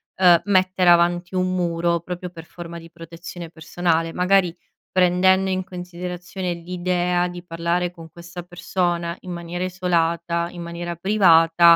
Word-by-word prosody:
ehm, 175 -3 +6
mettere 185 -2 +3
avanti 175 +1 +3
un 185 0 +1
muro, 170 -1 0
proprio 180 +1 -6
per 170 -2 -11
forma 170 0 -9
di 165 0 -12
protezione 170 0 -9
personale. 165 0 -1
Magari 180 0 +2 0.4
prendendo 185 +1 +4
in 185 0 -1
considerazione 180 0 -5
l'idea 180 +1 -1
di 175 0 -7
parlare 170 +1 -1
con 165 -2 -13
questa 175 +1 -9
persona, 175 0 -2
in 185 - -8
maniera 170 +1 -4
isolata, 170 -2 0
in 175 - -8
maniera 170 0 -5
privata, 170 -3 +5
175 Hz, 140 wpm, -22 LUFS, 170-180 Hz, 0.4 s, ehm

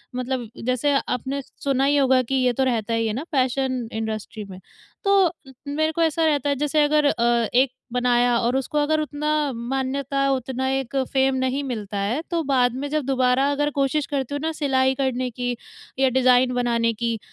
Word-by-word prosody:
मतलब 250 -2 -3 0.2
जैसे 255 +3 +1
आपने 265 +3 -2 0.2
सुना 270 -1 +1
ही 290 +1 +3
होगा 260 -2 +4
कि 260 +2 -3
ये 255 -2 +2
तो 265 - 0
रहता 230 -3 0
ही 230 0 +1
है 215 - -1
ना, 260 +7 -3
फ़ैशन 260 -2 0
इंडस्ट्री 220 -1 -4
में। 185 0 -9 0.4
तो 395 -4 +4 0.4
मेरे 315 +2 0
को 335 +1 -2
ऐसा 325 0 +1
रहता 290 -2 +1
है, 280 - +1
जैसे 295 +2 +1
अगर 300 0 +2
अ, 235 -3 +2
एक 255 +1 +4 0.2
बनाया 245 -1 +2
और 240 +2 0
उसको 270 +3 -3
अगर 310 +1 +2
उतना 300 0 -4 0.3
मान्यता, 270 +3 -1
उतना 260 0 -2
एक 270 -1 -2 0.2
फ़ेम 265 0 +3
नहीं 260 +2 -1
मिलता 215 -6 -4
है, 225 +10 -1
तो 335 - +1
बाद 250 -3 +2
में 280 +2 -3
जब 300 -3 -1
दोबारा 260 +1 +2
अगर 290 +1 0
क़ोशिश 280 +1 +1
करती 280 -1 -3
हूँ 285 - -2
ना 320 +1 -1
सिलाई 265 -4 +1
करने 255 -2 -1
की 245 +1 -3 0.4
या 265 -1 +4
डिज़ाइन 250 0 +3
बनाने 235 -2 +1
की, 230 0 -2
260 Hz, 190 wpm, -23 LUFS, 245-285 Hz, 0.4 s, होगा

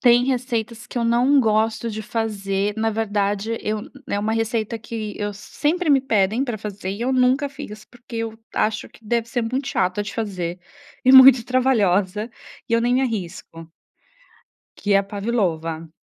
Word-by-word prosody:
Tem 245 -1 +5
receitas 235 -4 -2
que - - -12
eu 235 - 0
não 245 +5 +4
gosto 220 0 +1
de 215 - -5
fazer 205 -2 -2
na 225 0 +1
verdade 210 0 -1
eu 215 0 -2 0.3
eh, 200 - 0
uma 215 +2 -1
receita 225 0 -1
que 220 -1 -6
eu 205 0 -2
sempre 310 - -1
me 275 - +5
pedem 220 -1 +1
para 240 -5 -3
fazer 200 -2 -5
e 200 +4 -4
eu 260 +2 0
nunca 260 +3 +3
fiz, 215 -7 -9
porque 240 -1 -11
eu 225 -1 -4 0.2
acho 215 0 0
que 225 - -21
deve 235 +1 -1
ser 240 0 -1
muito 260 +4 -2
chata 185 +2 0
de 205 -1 -7
fazer 185 -6 -3 0.5
e 260 - +6
muito 260 -2 +9
trabalhosa, 215 -5 +1 0.4
e - - -4
eu 230 - +4
nem 245 +2 +2
arrisco 175 -7 -5 1.1
que 205 - -7
é 195 - +7
a - - +1
pavlova. 170 -7 -2
225 Hz, 170 wpm, -22 LUFS, 205-245 Hz, 1.1 s, muito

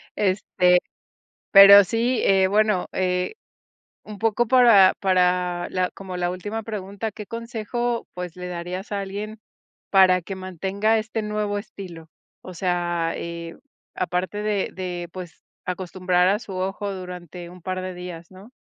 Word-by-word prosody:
Este, 185 -2 +2 0.7
pero 200 0 +10
sí, 230 +5 0
eh, 190 -1 +4
bueno, 210 -2 +2
eh, 180 - -1 0.7
un 210 -1 -9
poco 225 +2 +1
para 230 -7 +7
para 180 -2 +1
la 185 -1 0
como 190 -2 -8
la 175 0 -1
última 205 +5 -5
pregunta, 210 0 -5
¿qué 210 +1 -9
consejo, 230 +1 -3
pues 180 -1 -7
le 180 0 -6
darías 180 +3 -5
a 200 - -1
alguien 205 +3 -6 0.5
para 185 -2 +5
que 195 +3 -7
mantenga 195 +4 0
este 220 +1 -4
nuevo 210 -1 -2
estilo? 180 -6 -9 0.3
O 185 - -10
sea, 175 -1 -1
eh, 170 0 -7 0.4
aparte 185 +3 -2
de 210 -2 -1
de, 175 -2 -5
pues, 180 -2 -10 0.2
acostumbrar 180 0 0
a 205 +2 +1
su 200 - -9
ojo 195 +2 -3
durante 180 -2 -8
un 180 0 -14
par 185 +1 -3
de 185 0 -5
días, 175 -1 -9
¿no? 190 +5 -14
185 Hz, 145 wpm, -23 LUFS, 180-210 Hz, 0.7 s, pero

